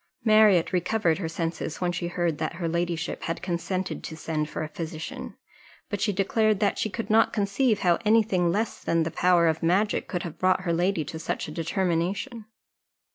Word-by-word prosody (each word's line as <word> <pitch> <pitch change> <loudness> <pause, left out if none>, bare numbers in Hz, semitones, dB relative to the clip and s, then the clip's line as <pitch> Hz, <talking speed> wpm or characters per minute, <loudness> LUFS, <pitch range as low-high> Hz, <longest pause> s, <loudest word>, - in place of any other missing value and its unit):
Marriott 215 -5 +5
recovered 180 -2 +1
her 165 -4 -3
senses 165 -1 -3
when 180 -1 0
she 175 0 -3
heard 175 -3 -1
that 155 +1 -2
her 170 0 -3
ladyship 170 0 -2
had 165 - -3
consented 185 +1 -3
to 160 - -7
send 155 -1 -2
for - - -4
a - - -3
physician; 160 0 -6 0.5
but 205 - -3
she 215 - +2
declared 210 +2 +1
that 205 - +1
she 215 - 0
could 220 +2 -4
not 225 +1 +5
conceive 210 +2 +1
how 175 -2 +3
any 220 +1 +5
thing 180 -5 +1
less 215 +5 -2
than 165 -1 +2
the 160 - -3
power 175 0 +3
of 160 0 0
magic 185 +6 +1
could 180 -2 -3
have 165 -3 -7
brought 185 0 +3
her 175 -2 -1
lady 175 -1 +1
to 160 +3 -6
such 160 - -3
a - - -7
determination. 185 - -2
175 Hz, 195 wpm, -26 LUFS, 165-205 Hz, 0.5 s, Marriott